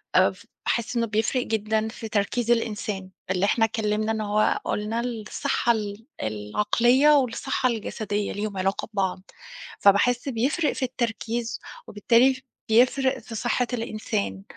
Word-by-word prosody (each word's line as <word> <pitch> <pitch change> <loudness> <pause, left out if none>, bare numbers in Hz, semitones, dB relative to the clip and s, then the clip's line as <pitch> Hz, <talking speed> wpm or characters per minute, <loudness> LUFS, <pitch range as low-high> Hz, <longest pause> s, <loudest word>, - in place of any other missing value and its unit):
آآ، - - +6
فباحِس 235 +1 -4
إنه 230 0 +1
بيفرِّق 225 +4 0
جدًا 220 -1 0
في 225 0 -8
تركيز 220 +3 0
الإنسان. 210 -4 -1 0.2
اللي 185 +1 +2
إحنا 225 +2 +3
اتكلَّمنا، 215 0 -1
إن 220 -1 -1
هو 210 0 +1
قُلنا 210 +2 -1
الصحة 235 0 -1
ال 210 0 -5 0.2
العقلية 210 - +2
والصحة 255 0 0
الجسدية، 210 -2 -2
ليهم 205 -1 -4
علاقة 190 +1 -1
ببعض. 190 -2 -1 0.6
فباحِس 240 +7 +4
بيفرِّق 275 +7 +1
في - - -4
التركيز، 235 -2 -3 0.3
وبالتالي 245 +5 +3 0.3
بيفرِّق 260 +3 +3
في 230 -1 -9
صحة 240 +2 0
الإنسان. 100 - -3
225 Hz, 130 wpm, -25 LUFS, 210-240 Hz, 0.6 s, آآ